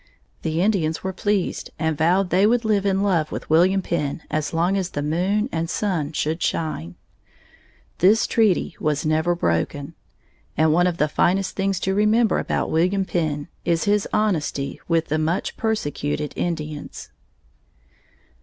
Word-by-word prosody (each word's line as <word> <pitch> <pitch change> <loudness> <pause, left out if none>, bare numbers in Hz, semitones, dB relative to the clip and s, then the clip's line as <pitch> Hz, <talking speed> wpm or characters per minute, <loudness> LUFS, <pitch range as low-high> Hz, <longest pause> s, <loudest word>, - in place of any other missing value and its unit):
The 160 +2 0
Indians 170 -7 0
were 190 0 -3
pleased 205 -1 -1
and 160 -1 0
vowed 180 +5 +2
they 190 +3 +4
would 235 +1 +2
live 205 -2 +2
in 195 0 +1
love 170 -6 +1
with - - -6
William 185 +4 +4
Penn 150 -3 -2
as 155 0 -1
long 170 +4 +1
as 190 -2 -1
the 145 - -4
moon 185 +8 0
and 165 0 -2
sun 175 -7 -1
should 160 +2 -2
shine. 90 - -2 1.0
This 205 +6 +5
treaty 210 -7 +1
was 150 -1 -1
never 160 +3 +1
broken. 140 - -1 0.6
And 155 +1 +4
one 175 +2 +4
of 175 -2 -1
the 150 - +2
finest 185 +5 +1
things 195 -1 0
to 190 - 0
remember 215 +3 +3
about - - -1
William 185 +4 +2
Penn 155 -5 -2 0.2
is 170 -1 +1
his 205 0 +1
honesty 155 -9 -1
with 165 -1 +1
the 155 +1 +1
much 160 +3 -1
persecuted 150 -9 -2
Indians. 155 -4 -4
170 Hz, 155 wpm, -22 LUFS, 155-195 Hz, 1.0 s, This